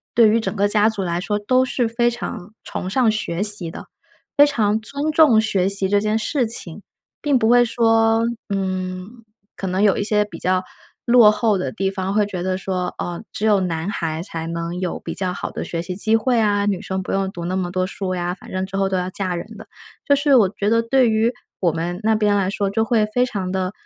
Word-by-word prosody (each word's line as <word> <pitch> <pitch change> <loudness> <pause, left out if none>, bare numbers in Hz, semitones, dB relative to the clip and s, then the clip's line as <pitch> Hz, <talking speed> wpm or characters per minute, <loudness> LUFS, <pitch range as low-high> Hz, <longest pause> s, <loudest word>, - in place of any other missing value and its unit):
对 230 -2 +6
于 225 +2 +3
整 210 -2 -3
个 200 +1 +2
家 210 +1 +5
族 210 -3 -1
来 170 -1 -2
说 205 +3 -1
都 255 +5 +2
是 250 -1 -1
非 240 +1 +1
常 220 -4 -7
崇 185 - -5
尚 235 +2 +2
学 205 -3 -2
习 205 -5 +3
的， - - -10 0.5
非 290 - +8
常 220 -6 +1
尊 280 +7 -2
重 300 -8 +5
学 195 -4 +1
习 195 -1 +2
这 205 0 +3
件 215 +1 0
事 245 +3 0
情。 205 -4 -4 0.4
并 285 -4 +2
不 220 - +2
会 245 +1 +6
说， 225 -1 +2 0.3
嗯， 185 +3 -4 0.3
可 195 - -6
能 185 +1 -1
有 205 -2 +4
一 - - -1
些 210 0 +2
比 210 - -11
较 185 0 +1 0.4
落 235 -3 +7
后 215 -1 +1
的 185 - -3
地 195 -3 -1
方 190 0 -3
会 210 0 +2
觉 185 -3 -5
得 185 0 -1
说， 185 -2 -3
哦， 175 +3 -5
只 215 - -3
有 205 -3 +3
男 170 0 -2
孩 165 -5 -3
才 165 -3 -6
能 170 +1 -4
有 180 - -3
比 - - -6
较 185 -2 -2
好 - - -5
的 - - -5
学 170 -1 -4
习 180 +1 -5
机 220 +3 +2
会 240 +2 +1
啊， 205 -2 +2
女 200 -3 -1
生 190 0 -3
不 185 - -5
用 195 0 -1
读 170 -2 -7
那 185 +2 -2
么 180 -2 -2
多 185 0 -1
书 190 -1 -4
呀， 175 0 -2
反 185 - -13
正 185 0 -2
之 195 - -8
后 195 0 +1
都 190 - 0
要 180 0 -2
嫁 185 -2 -2
人 - - -6
的。 - - -11 0.4
就 285 - +4
是 285 -1 +3
我 210 -7 +5
觉 205 0 -2
得 230 +1 +3
对 255 +2 +3
于 220 +2 +2 0.3
我 175 -4 +3
们 170 +2 -3
那 220 +1 +3
边 210 -1 +2
来 190 -2 +1
说， 200 -1 -1
就 220 +3 0
会 220 -2 +2
非 245 +4 +1
常 190 -6 -4
地 185 0 -1
205 Hz, 255 characters per minute, -20 LUFS, 185-225 Hz, 0.5 s, 非